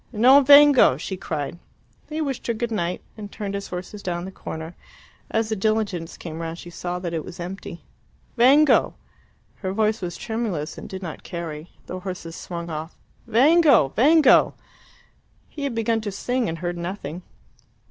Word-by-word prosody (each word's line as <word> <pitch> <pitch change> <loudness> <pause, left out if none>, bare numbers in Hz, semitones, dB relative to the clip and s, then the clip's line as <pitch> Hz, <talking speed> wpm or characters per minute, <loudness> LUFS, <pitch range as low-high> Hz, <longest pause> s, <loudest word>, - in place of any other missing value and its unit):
"Non 255 +5 +6
vengo!" 285 - +7
she 190 +6 -5
cried. 170 -3 -4 0.5
He 310 +1 -3
wished 275 -5 -3
her 235 - 0
good 235 +1 -3
night, 180 -4 -2
and 205 -2 -9
turned 205 -2 -5
his 200 0 -4
horses 180 +3 -7
down 175 -1 -3
the 190 - -7
corner. 160 -2 -7 0.5
As 225 -1 0
the 220 - 0
diligence 205 -5 -1
came 160 -1 -7
round 165 0 -5
she 175 - -10
saw 175 +1 -4
that 175 -2 -5
it 160 -2 -2
was 180 - -10
empty. 180 0 -7 0.5
"Vengo..." 275 +5 +5 0.6
Her 190 -2 -4
voice 215 +1 +1
was 175 -2 -4
tremulous, 210 -10 -3
and - - -9
did 190 0 -7
not 165 -3 -6
carry. 165 -2 -6 0.2
The 185 - -6
horses 180 -3 -7
swung 170 -1 -6
off. 155 +2 -6 0.3
"Vengo! 275 - +5
Vengo!" 290 - +5 0.9
He 285 -2 -6
had 265 -4 -3
begun 225 0 0
to 210 -2 -4
sing, 245 +4 -1
and 165 - -4
heard 175 0 -4
nothing. 170 -2 -5
195 Hz, 170 wpm, -23 LUFS, 170-230 Hz, 0.9 s, vengo